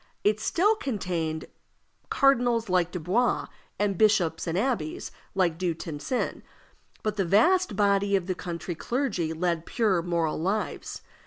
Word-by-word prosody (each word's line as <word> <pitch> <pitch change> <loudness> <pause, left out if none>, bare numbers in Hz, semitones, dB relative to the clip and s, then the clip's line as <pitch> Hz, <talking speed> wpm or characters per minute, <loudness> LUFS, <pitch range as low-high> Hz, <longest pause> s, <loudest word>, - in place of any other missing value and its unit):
It 210 +1 +3
still 400 - +2
contained 180 - -3 0.6
cardinals 245 -5 +3
like 180 -2 +2
Dubois, 185 +8 0 0.3
and 200 -3 0
bishops 185 -7 +3
and 165 +1 -1
abbés 205 - -1 0.2
like 175 -4 +1
Du 175 -3 0
Tencin, 160 - -3 0.6
but 215 -1 -1
the 195 - +2
vast 350 - +3
body 200 -1 +3
of 190 -3 0
the 185 - -1
country 175 0 -5
clergy 210 - -1
led 170 0 -1
pure 205 -7 +2
moral 165 -3 -1
lives. 200 +5 -2
190 Hz, 135 wpm, -27 LUFS, 170-225 Hz, 0.6 s, It